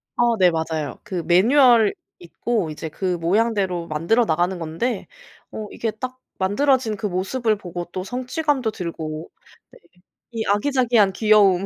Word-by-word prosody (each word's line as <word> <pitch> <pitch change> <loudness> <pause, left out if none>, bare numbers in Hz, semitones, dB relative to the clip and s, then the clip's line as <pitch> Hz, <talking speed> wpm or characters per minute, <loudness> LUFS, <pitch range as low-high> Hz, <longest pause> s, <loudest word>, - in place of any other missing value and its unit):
어 240 -1 +3
네 185 -3 +5
맞아요. 160 -2 -3
그 185 -5 -4
매뉴얼 230 +4 +5 0.3
있고 185 +2 -2
이제 155 +1 -6
그 180 +3 -2
모양대로 190 -1 0
만들어나가는 175 +2 +1
건데 175 +8 -3 0.4
어 215 -1 -6
이게 225 - -2
딱 255 +4 -6 0.2
만들어진 230 +4 +2
그 220 - -5
모습을 215 +5 0
보고 175 -2 -6
또 185 - -4
성취감도 255 - -1
들고 165 -4 -6 0.4
네. - - -18 0.5
이 225 -1 -3
아기자기한 230 -2 +2
귀여움. 200 -3 +4
200 Hz, 295 characters per minute, -22 LUFS, 175-235 Hz, 0.5 s, 네